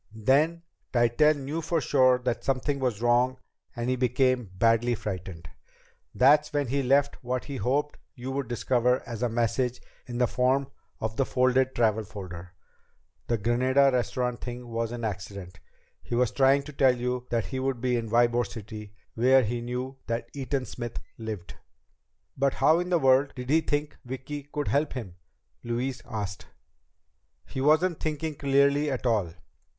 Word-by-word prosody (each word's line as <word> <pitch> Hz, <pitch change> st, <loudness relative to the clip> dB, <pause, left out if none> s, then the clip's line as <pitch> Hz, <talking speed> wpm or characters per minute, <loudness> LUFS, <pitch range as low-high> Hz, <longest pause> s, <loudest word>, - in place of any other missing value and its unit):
Then 150 Hz, +9 st, +2 dB, 0.3 s
Tytell 120 Hz, +6 st, +4 dB
knew 145 Hz, +4 st, -4 dB
for 165 Hz, +1 st, 0 dB
sure 130 Hz, -3 st, +4 dB
that 125 Hz, -1 st, -2 dB
something 135 Hz, +1 st, 0 dB
was 120 Hz, -4 st, -1 dB
wrong 125 Hz, +2 st, +3 dB, 0.4 s
and 120 Hz, 0 st, -3 dB
he 130 Hz, -, +1 dB
became 125 Hz, -2 st, +1 dB
badly 115 Hz, +4 st, +3 dB
frightened. 90 Hz, -5 st, -6 dB, 0.7 s
That's 150 Hz, +4 st, +5 dB
when 145 Hz, -3 st, -1 dB
he 140 Hz, +2 st, +1 dB
left 140 Hz, +2 st, +2 dB
what 125 Hz, 0 st, -2 dB
he 140 Hz, -2 st, -5 dB
hoped 145 Hz, +4 st, -1 dB, 0.2 s
you 130 Hz, 0 st, -6 dB
would 135 Hz, -2 st, -2 dB
discover 125 Hz, +1 st, +1 dB
as 115 Hz, -1 st, -6 dB
a 125 Hz, -, +1 dB
message 120 Hz, +2 st, 0 dB, 0.3 s
in 120 Hz, -1 st, -5 dB
the 125 Hz, -, +3 dB
form 130 Hz, +3 st, +1 dB, 0.3 s
of 110 Hz, 0 st, -3 dB
the 135 Hz, -, +3 dB
folded 130 Hz, 0 st, +2 dB
travel 110 Hz, -2 st, +2 dB
folder. 90 Hz, -3 st, -9 dB, 0.7 s
The 120 Hz, -, +1 dB
Granada 130 Hz, +5 st, +3 dB
Restaurant 125 Hz, 0 st, -1 dB
thing 120 Hz, 0 st, -6 dB
was 115 Hz, 0 st, -2 dB
an 120 Hz, -1 st, -5 dB
accident. 100 Hz, -3 st, -6 dB, 0.4 s
He -, -, -4 dB
was 125 Hz, -1 st, +2 dB
trying 135 Hz, +1 st, +4 dB
to 150 Hz, +1 st, -10 dB
tell 130 Hz, -2 st, +4 dB
you 125 Hz, 0 st, -2 dB
that 115 Hz, -2 st, 0 dB
he 130 Hz, -, -4 dB
would 130 Hz, -2 st, -1 dB
be 125 Hz, 0 st, 0 dB
in 115 Hz, -2 st, -2 dB
Ybor 120 Hz, +1 st, +3 dB
City, 105 Hz, -2 st, -9 dB, 0.2 s
where 130 Hz, +3 st, +4 dB
he 120 Hz, +2 st, -2 dB
knew 125 Hz, +2 st, -4 dB
that 115 Hz, 0 st, -3 dB
Eaton 135 Hz, -1 st, -2 dB
Smith 120 Hz, +1 st, -6 dB, 0.2 s
lived." 110 Hz, -5 st, -6 dB, 0.8 s
"But 140 Hz, 0 st, +1 dB
how 160 Hz, +2 st, +4 dB
in 180 Hz, 0 st, -3 dB
the 175 Hz, -, +3 dB
world 135 Hz, -1 st, +3 dB
did 125 Hz, +1 st, -5 dB
he 160 Hz, +1 st, +5 dB
think 145 Hz, -1 st, -2 dB
Vicki 135 Hz, +3 st, -7 dB
could 145 Hz, -1 st, -2 dB
help 145 Hz, +1 st, +1 dB
him?" 100 Hz, -9 st, -7 dB, 0.5 s
Louise 120 Hz, +2 st, -2 dB
asked. 100 Hz, -3 st, -5 dB, 1.0 s
"He 130 Hz, -, -5 dB
wasn't 155 Hz, +4 st, +3 dB
thinking 155 Hz, 0 st, -2 dB
clearly 140 Hz, +1 st, +2 dB
at 130 Hz, -2 st, -3 dB
all. 105 Hz, -9 st, +1 dB
125 Hz, 165 wpm, -27 LUFS, 115-140 Hz, 1.0 s, That's